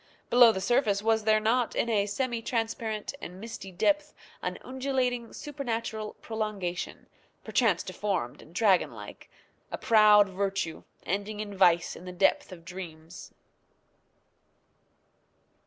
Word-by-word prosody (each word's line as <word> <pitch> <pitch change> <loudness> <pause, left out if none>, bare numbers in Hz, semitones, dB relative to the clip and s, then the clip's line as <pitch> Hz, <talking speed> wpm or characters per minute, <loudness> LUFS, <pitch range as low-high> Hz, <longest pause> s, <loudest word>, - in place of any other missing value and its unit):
below 240 -1 +8
the 190 - -3
surface 205 -1 +1
was 220 -1 +2
there 215 0 +4
not, 230 +3 +1
in - - +1
a 205 -3 +1
semi 235 +2 -2
transparent 225 -1 -2
and 180 +2 -8
misty 205 -3 -8
depth, 300 - +1 0.3
an - - -3
undulating, 255 -3 -1
supernatural 230 -7 -4
prolongation, 210 -6 -4 0.4
perchance 225 -8 +2
deformed 185 -10 -3
and 165 - -17
dragon 195 -3 +4
like 105 -3 -11 0.4
a - - -3
proud 210 -2 +6
virtue 195 -3 -2 0.2
ending 205 +3 -2
in 205 -1 -5
vice 175 -3 +3
in 180 - -11
the 180 - -6
depth 195 +9 +2
of 170 -2 -11
dreams. 170 -2 -9
210 Hz, 125 wpm, -28 LUFS, 185-230 Hz, 0.4 s, below